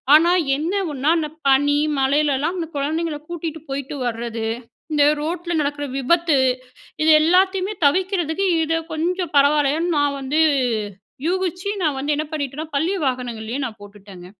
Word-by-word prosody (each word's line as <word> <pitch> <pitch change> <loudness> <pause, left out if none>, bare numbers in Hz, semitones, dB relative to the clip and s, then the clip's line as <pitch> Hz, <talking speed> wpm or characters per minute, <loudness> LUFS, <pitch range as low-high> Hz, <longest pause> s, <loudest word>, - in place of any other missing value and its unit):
ஆனா, 335 +3 +5 0.3
என்ன 325 +6 -2 0.2
ஒண்ணா 280 +2 -1
அந்த 310 - -1 0.2
பனி, 285 +2 +4 0.2
மழையில்லாம் 290 +4 +1
அந்த 330 -2 -3
குழந்தைங்களை 305 +2 -2
கூட்டிட்டு 325 -2 -5
போயிட்டு 275 +1 -4
வரது, 230 -1 -3 0.4
இந்த 295 -1 +3 0.2
ரோட்டுல 345 +2 -3
நடக்கிற 290 0 -2
விபத்து. 325 +2 +2 0.7
இது 320 - +3
எல்லாத்தையுமே 375 +4 +2
தவிர்க்கிறதுக்கு 365 +2 +1 0.2
இத 320 +1 -1 0.2
கொஞ்சம் 345 +1 -2
பரவாயில்லன்னு 295 +4 +3
நான் 285 -1 +1
வந்து 275 +4 0 0.8
யூகிச்சு, 365 +1 -1
நான் 305 -4 +1
வந்து 285 +3 -1
என்ன 305 +1 -2
பண்ணிட்டேனா 295 0 -4
பள்ளி 325 +7 +1
வாகனங்கள்லயே 245 -1 -3
நான் 225 -3 -7
போட்டுட்டேங்க. 200 -3 -13
300 Hz, 135 wpm, -21 LUFS, 275-340 Hz, 0.8 s, ஆனா